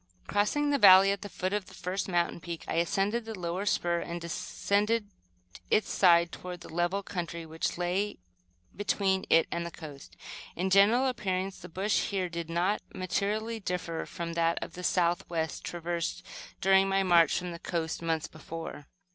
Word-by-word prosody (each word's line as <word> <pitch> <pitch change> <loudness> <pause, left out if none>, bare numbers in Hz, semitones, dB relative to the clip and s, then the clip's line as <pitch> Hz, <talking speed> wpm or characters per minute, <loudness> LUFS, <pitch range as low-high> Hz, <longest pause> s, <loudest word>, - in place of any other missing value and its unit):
Crossing 290 +9 +1
the 285 - +2
valley 195 -1 +8
at 200 - -2
the 205 - -7
foot 185 +1 -3
of 210 -2 -2
the - - -13
first 185 +3 -3
mountain 175 -1 0
peak, 170 0 -6
I - - -2
ascended 195 +6 +1
the 220 -2 -7
lower 180 +4 -3
spur 170 -3 +1
and 170 0 -5
descended 205 +5 -1 0.6
its 215 - +2
side 170 -2 +5
toward 180 -1 -7
the 165 - -11
level 175 +4 0
country 170 -3 -5
which 160 +1 -3
lay 180 +4 -1 0.6
between 195 -2 0
it 165 - +5
and 170 - -1
the 170 - -4
coast. 150 -4 -11 0.4
In 185 +2 -1
general 210 +7 +5
appearance, 195 -6 -2
the 180 - -10
bush 195 +5 0
here 190 -3 -1
did 170 -1 -5
not 175 +5 +1
materially 210 +5 -1
differ 175 -4 -3
from 170 -2 -5
that 165 0 +1
to - - -6
the 180 - -9
southwest, 170 -2 0
traversed 170 -1 -3 0.4
during 195 +1 +5
my 195 0 +2
march 170 -4 +5
from 180 0 -4
the 170 - -7
coast 165 -2 -3
months 165 -2 -1
before. 160 -2 -8
180 Hz, 170 wpm, -29 LUFS, 170-200 Hz, 0.6 s, valley